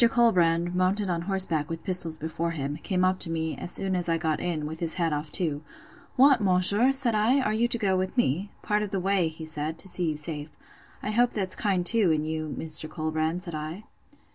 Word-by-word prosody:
Colbrand, 175 -8 +2
mounted 185 +2 +1
on 170 -1 -2
horseback, 170 -6 +3
with 165 0 -6
pistols 170 -4 +2
before 160 +2 -3
him, 145 -3 -4
came 185 +2 -1
up 185 0 +1
to 170 - +2
me, 160 -1 -3
as - - -3
soon 190 0 +1
as 175 -1 -2
I 165 - +1
got 160 -2 -2
in, 160 -4 -3
with 160 +1 -7
his 165 -2 +1
hat 170 -3 0
off 150 +1 -4
too. 155 -5 0 0.5
What, 265 -2 +5
monsieur! 200 +6 +2
said 270 -4 +3
I, 220 +6 +2
are 215 -5 0
you 230 +2 +1
to 240 - -2
go 200 -4 0
with 185 +6 -3
me?—Part 210 - -1
of 210 - -3
the 195 -1 -2
way, 190 -2 +1
he 160 0 -8
said, 155 0 -2
to 190 - +2
see 175 -2 +1
you 155 - -3
safe. 150 0 -6 0.5
I 210 - -2
hope 240 +3 +2
that's 190 -3 -2
kind 190 -4 -1
too, 220 -2 +4
in 155 -1 0
you, 155 -1 -4
Mr. 155 -1 +1
Colbrand, 160 +2 -2
said 170 -3 -4
I. 155 +6 -6
175 Hz, 220 wpm, -26 LUFS, 160-200 Hz, 0.5 s, What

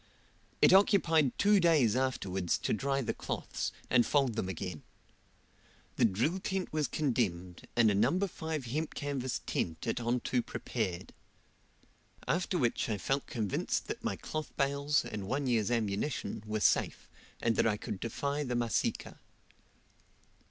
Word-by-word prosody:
It - - +7
occupied 170 - +4
two 205 0 +5
days 155 - +4
afterwards 95 -9 0
to - - -1
dry 135 +4 0
the - - -1
cloths, - - -4 0.2
and 120 -1 +4
fold 135 -3 +2
them 95 -4 -2
again. 90 -3 -5 1.2
The - - +5
drill 120 - +1
tent 190 -2 -3
was 155 -2 +1
condemned, 95 - -1
and 115 -3 +5
a - - +1
No. 115 - +3
5 160 -7 -3
hemp 150 +7 -3
canvas 135 -3 -2
tent 80 -1 -2
at - - -1
onto 120 +1 0
prepared. 90 -6 -4 1.1
After 180 +2 0
which 120 -5 0
I 105 - 0
felt 135 +9 -1
convinced 110 -6 -1
that - - -5
my - - -1
cloth 155 -1 -5
bales, 140 +1 +1
and 105 -2 -5
one 135 +5 -1
year's 115 -5 +1
ammunition, 115 +2 -1
were 110 0 -2
safe, - - +2 0.3
and 115 -1 +1
that - - +3
I 105 -2 +1
could 95 - -5
defy 140 +5 -2
the 125 -3 -2
Masika. 120 -1 -1
125 Hz, 145 wpm, -32 LUFS, 110-150 Hz, 1.2 s, It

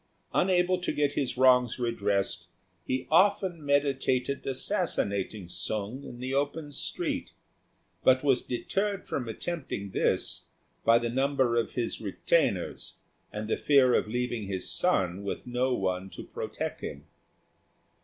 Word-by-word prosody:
Unable 180 0 +3
to - - -1
get 145 -1 +1
his 140 -3 -2
wrongs 125 -2 +5
redressed, 100 -5 -1 0.4
he 130 0 -1
often 185 -1 +3
meditated 140 -2 +1
assassinating 100 -6 -1
Sung 110 +8 -3
in 120 - -9
the 130 +2 -4
open 145 +2 -1
street, 140 - -3 0.7
but 130 +1 +5
was 135 -3 +3
deterred 195 +10 -2
from 120 -4 -3
attempting 120 - -4
this - - 0 0.4
by 115 - +6
the 120 0 -1
number 130 -2 +2
of 115 - 0
his 120 -2 -2
retainers 100 -3 0 0.4
and 105 +1 -4
the - - 0
fear 135 -4 +5
of - - +2
leaving 120 -2 -2
his 95 -2 -2
son 95 - +1
with 100 - -4
no 125 +1 0
one 95 -1 -2
to - - -8
protect - - -5
him. - - -6
125 Hz, 135 wpm, -29 LUFS, 110-145 Hz, 0.7 s, by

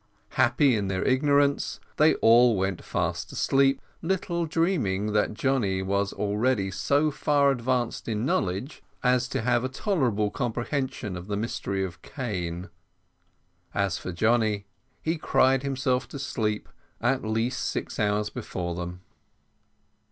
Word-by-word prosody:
Happy 130 +1 +3
in 100 -2 -1
their 95 -1 -1
ignorance, 140 +1 +2 0.2
they 155 +1 +5
all 115 0 +5
went 95 -1 -1
fast - - -2
asleep, 135 0 +2 0.2
little 170 -1 -1
dreaming 130 - 0
that 105 0 +1
Johnny 105 -7 +1
was 100 +1 0
already 105 -1 0
so 145 +10 +2
far 140 -1 +3
advanced 125 -2 -1
in 110 0 -1
knowledge 100 +6 -1 0.2
as 125 -1 +3
to 115 - -2
have 120 0 +2
a 130 - -1
tolerable 130 - 0
comprehension 125 -3 -2
of 90 +1 -7
the 100 -1 -2
mystery 100 -3 -2
of 85 -2 -9
cane. 90 - -4 1.1
As 100 -2 0
for 95 - -5
Johnny, 110 +1 +1 0.4
he 160 - +1
had 165 -2 -4
cried 130 0 +3
himself 130 -2 0
to - - -8
sleep 110 -6 -2 0.3
at 130 +3 +1
least 115 +4 -1
six - - -4
hours 105 0 +1
before 90 -7 -4
them. 90 +1 -6
120 Hz, 135 wpm, -27 LUFS, 100-135 Hz, 1.1 s, they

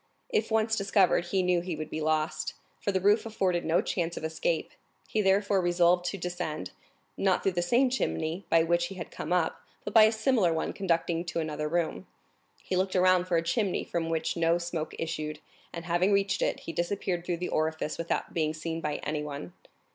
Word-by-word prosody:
If 450 -3 0
once 220 0 +2
discovered, 195 -4 +3
he 185 +1 0
knew 180 -1 +2
he 175 -1 -4
would 155 0 -6
be 155 - -3
lost, 155 0 0 0.2
for 200 - -1
the 190 - +1
roof 205 +3 +4
afforded 190 -6 0
no 165 +2 +2
chance 170 -2 -2
of - - -5
escape; 160 +1 -1 0.4
he 215 - 0
therefore 195 0 +3
resolved 175 0 +3
to 190 +3 -2
descend, 170 - -4 0.5
not 190 -2 +2
through 195 - +2
the 175 -1 -1
same 245 +9 +3
chimney 175 -7 -1
by 165 -1 +5
which 170 +1 +1
he 195 - -9
had 175 - -7
come - - -6
up, 180 -3 +1 0.2
but 205 - -4
by 220 -1 +9
a 220 - +4
similar 220 -5 +2
one 160 0 -1
conducting 170 -3 0
to 170 - -2
another 155 -1 -2
room. 170 +2 -1 0.6
He 185 - -2
looked 185 +1 0
around 185 -1 +4
for 180 -2 +1
a 165 - +1
chimney 190 +3 0
from 165 -1 -2
which 165 -1 -1
no 170 0 +3
smoke 170 -2 -4
issued, 155 -2 -3 0.3
and 170 0 -7
having 175 +3 +2
reached 200 0 +2
it, - - 0
he 165 - -6
disappeared 175 0 -1
through 175 -1 -2
the 180 - -3
orifice 155 0 -1
without 165 - -2
being 155 -2 0
seen 165 +1 -4
by 150 -2 -2
anyone. 150 +1 -4
175 Hz, 200 wpm, -29 LUFS, 165-190 Hz, 0.6 s, by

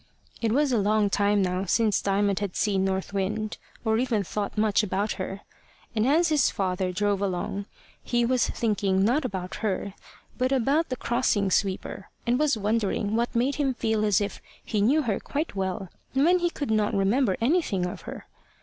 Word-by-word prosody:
It 225 -2 +1
was 285 +3 +2
a 235 - +3
long 205 0 +2
time 205 0 +2
now 185 +1 -1
since 215 +1 +2
Diamond 200 0 +1
had 200 -3 -4
seen 195 -3 +1
North 190 +1 -2
Wind, 210 +2 -2 0.3
or 220 0 +2
even 240 -5 +1
thought 205 +3 -4
much 215 -1 +3
about 205 0 -1
her. 195 +1 -5 0.5
And 220 +2 +2
as 325 +4 +4
his 300 -4 +3
father 185 -1 -1
drove 205 +1 0
along, 200 +1 -2 0.4
he 240 -1 +1
was 250 0 +2
thinking 200 -4 +1
not 260 +6 +2
about 185 -6 -4
her, 200 -2 -2 0.5
but 255 +1 +1
about 275 +5 +2
the 255 - -1
crossing 230 -6 0
sweeper, 195 0 -1 0.2
and 245 +2 +2
was 300 -5 +2
wondering 210 0 0
what 235 +1 -1
made 255 +4 +1
him 275 -3 0
feel 220 -2 0
as 205 -3 +3
if 205 -1 -4 0.2
he 210 - 0
knew 285 +9 +3
her 215 -6 -1
quite 295 -2 -3
well, 190 -1 -3 0.2
when 330 +7 +4
he 345 0 +1
could 285 -7 -4
not 215 0 +1
remember 200 +2 +2
anything 235 - +1
of 180 - -5
her. - - -8
215 Hz, 185 wpm, -26 LUFS, 195-250 Hz, 0.5 s, as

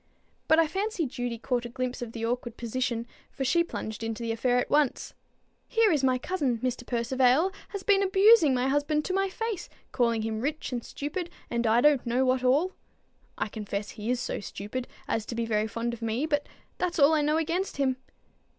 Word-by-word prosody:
But 315 - +5
I 330 - +5
fancy 385 +1 -1
Judy 245 -2 -3
caught 245 +1 -1
a 240 - -6
glimpse 255 +1 -3
of 240 -2 -5
the 230 -1 -4
awkward 240 0 -3
position, 235 0 -2 0.2
for 270 - -4
she 340 +6 +3
plunged 220 -10 -6
into 225 +1 -3
the 230 - -1
affair 245 +2 +1
at 250 - -1
once. 295 -3 +1 0.5
"Here 450 -3 +3
is 295 -4 +1
my 255 -1 +3
cousin, 275 -4 -1
Mr. 250 -1 -2
Percivale, 255 +7 +2 0.2
has 400 -2 -6
been 400 0 +4
abusing 385 - +6
my 250 +1 +1
husband 290 +2 +1
to 370 - -2
my 390 0 +1
face, 445 -1 -4 0.2
calling 230 -3 +1
him 220 0 -2
rich 295 +2 -2
and 240 -2 -3
stupid, 335 +5 -4 0.2
and 235 -1 0
I 225 +2 +4
don't 295 -2 +4
know 245 +2 +1
what 255 0 +2
all. 290 +9 +3 0.6
I - - -1
confess 210 -1 -5
he 215 +2 -6
is 250 0 +1
so - - -3
stupid 210 +5 -5 0.2
as 225 - 0
to 235 - -4
be 230 0 -1
very 215 -1 +1
fond 230 +2 -3
of 235 - -8
me, 230 +5 -1
but 290 -2 -1 0.3
that's 360 -1 -1
all 295 +1 +6
I 310 - +3
know 300 +1 +2
against 335 +3 -1
him." 265 -2 +1
255 Hz, 205 wpm, -28 LUFS, 235-315 Hz, 0.6 s, abusing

